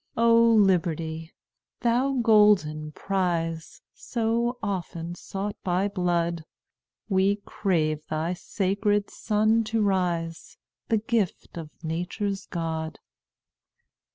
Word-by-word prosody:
"O 230 0 +5 0.2
Liberty! 165 -5 +1 0.5
thou 245 +3 +2
golden 200 -9 +4
prize, 170 -4 -2
So 235 +1 -1
often 175 -4 -3
sought 195 +3 -5
by 185 +2 +1
blood, 170 -3 0 0.6
We 195 0 +3
crave 155 -6 -1
thy 160 +3 -1
sacred 200 +2 0
sun 215 +1 +2
to 225 +1 -1
rise, 175 -4 -1 0.3
The 225 - +3
gift 215 -3 -1
of 165 -3 -6
Nature's 180 +5 -3
God. 160 -2 -3
190 Hz, 95 wpm, -26 LUFS, 165-210 Hz, 0.6 s, O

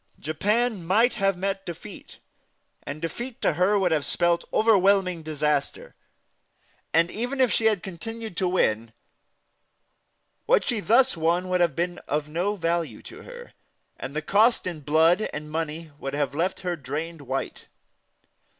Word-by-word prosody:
Japan 205 +7 0
might 220 +8 +3
have 195 -3 +1
met 195 +1 -2
defeat, 175 -4 -9 0.6
and 145 +2 -6
defeat 235 - -5
to - - +3
her 185 +6 +3
would 185 -3 +2
have 155 -3 +2
spelt 175 +2 +1
overwhelming 195 -5 +3
disaster; 150 -2 -2 1.0
and 165 +1 +3
even 245 +5 -3
if 255 -3 +4
she 225 - +1
had 215 -5 +2
continued 220 +3 -7
to 185 - +1
win, 115 -11 +1 1.5
what - - +4
she 235 -4 -1
thus 240 +5 +4
won 170 +3 0
would 180 -1 +2
have 170 -5 +2
been 175 +1 -2
of 150 0 -1
no 175 +7 -1
value 170 -2 -2
to - - -11
her, 485 0 -11 0.4
and 140 - -7
the 155 - -2
cost 220 +7 +3
in 175 -4 -4
blood 160 +7 +3
and 150 0 -7
money 160 0 -4
would 135 +1 -4
have 145 -2 -1
left 170 +6 -1
her 180 -2 -2
drained 155 +3 -5
white. 135 0 -4
175 Hz, 150 wpm, -25 LUFS, 155-205 Hz, 1.5 s, if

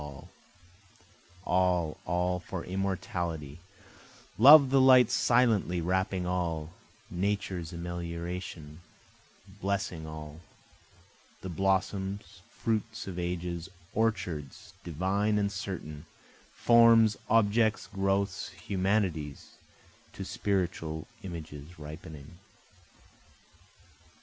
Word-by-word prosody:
All, 90 -3 +1
all 90 +1 0
for 90 -1 -6
immortality, 90 -5 -3 0.8
Love 145 +6 +11
like 135 - -3
the 135 -1 +5
light 130 -3 +7
silently 115 -7 +3
wrapping 95 +1 0
all, 85 -3 -2 0.4
Nature's 95 -2 -2
amelioration 85 -2 -6 0.8
blessing 95 -5 -2
all, 75 0 -8 1.0
The 95 - -6
blossoms, 95 +1 -1
fruits 110 -1 -2
of 90 -2 -6
ages, 85 0 -3 0.2
orchards 100 -4 -2
divine 95 +6 0
and 100 -1 +1
certain, 85 -6 -6 0.4
Forms, 115 -2 +6
objects, 110 0 +3
growths, 95 -1 -1
humanities, 95 -7 -1 0.6
to - - -6
spiritual 85 -5 -2 0.2
images 80 -3 -8
ripening. 75 +1 -10
90 Hz, 80 wpm, -30 LUFS, 85-100 Hz, 1.0 s, Love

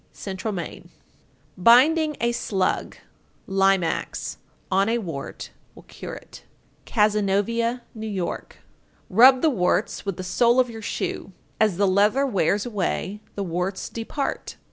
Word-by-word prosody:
Central 195 +2 -5
Maine. 175 -5 -6 0.7
920. 180 - -10
Binding 300 - +5
a 235 0 +1
slug 195 -5 -1 0.5
(Limax) 195 -3 0 0.3
on 195 +2 +3
a 235 - +2
wart 165 -11 -6 0.2
will - - -14
cure - - -8
it. - - -13 0.4
Cazenovia, 215 +3 +1
N.Y. 220 0 -5
921. 180 -2 -3 0.7
Rub 255 +6 +7
the 315 - +4
warts 190 -1 0
with 195 -3 -4
the 185 - -5
sole 235 +6 +3
of 250 -2 +2
your 225 -1 -8
shoe; 205 - -4 0.3
as 215 -5 +2
the 200 - +3
leather 210 +8 +3
wears 205 - +1
away, 210 -2 -2
the 200 - -2
warts 180 +2 -3
depart. 235 +5 -4
210 Hz, 135 wpm, -24 LUFS, 190-235 Hz, 0.7 s, Rub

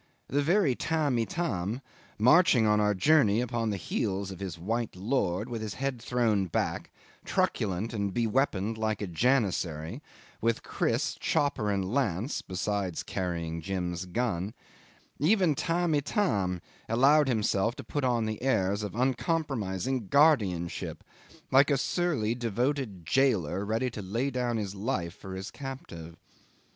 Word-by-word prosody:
The 145 +2 +2
very 170 -1 +3
Tamb' 150 -2 0
Itam, 115 - -2 0.4
marching 125 0 +5
on 105 0 +4
our 105 -1 +2
journeys 120 -1 +4
upon 120 -2 -1
the 100 - -1
heels 95 +1 -2
of 95 - -9
his 95 -4 -5
white 115 +6 -2
lord, 100 -1 0
with 120 -3 -4
his 110 -1 -4
head 135 -3 -3
thrown 115 -5 +1
back, 80 - -2 0.3
truculent 105 +3 0
and 100 -3 -1
be 115 +4 0
weaponed 110 -3 0
like 110 -1 -1
a - - 0
janissary, 90 - 0 0.4
with 115 0 +1
kriss, - - 0
chopper, 135 -7 +1
and 100 0 -1
lance 120 - 0
(besides 95 -1 -2
carrying 85 -3 -3
Jim's 90 0 -3
gun); 100 0 -2 0.6
even 180 +2 +4
Tamb' 170 +3 0
Itam 110 - 0 0.3
allowed 140 +6 +5
himself 110 -1 +1
to - - -8
put 145 - -3
on 120 -3 +2
the 110 -1 -4
airs 100 -6 +1
of 105 -2 -5
uncompromising 130 - -1
guardianship, 105 - +2 0.5
like 140 +3 +6
a 140 - +3
surly 145 -8 0
devoted 120 - -2
jailer 95 - +2
ready 115 +5 -1
to 105 - -6
lay 115 +9 -1
down 125 -2 -1
his 100 -3 -3
life 95 -5 -2
for 95 -1 -8
his 95 +1 -6
captive. 85 - -8
110 Hz, 140 wpm, -29 LUFS, 95-135 Hz, 0.6 s, like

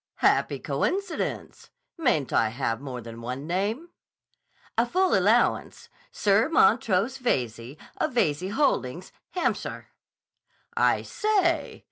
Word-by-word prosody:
"Happy - - +2
coincidence! 390 -3 -3 0.3
Mayn't 245 - 0
I 110 - +3
have 115 0 -2
more 130 -3 -6
than 115 0 -9
one 125 +4 -5
name?" 205 - -2 0.9
"A 230 - +3
full 370 +10 +1
allowance. - - +2 0.2
Sir 205 +6 +2
Montrose 230 - +3
Veyze, 125 - -2 0.2
of - - -1
Veyze 180 -4 +1
Holdings, 185 - 0 0.2
Hampshire." 360 - -2 0.9
"I - - +2
say! 355 -8 0
200 Hz, 105 wpm, -26 LUFS, -, 0.9 s, I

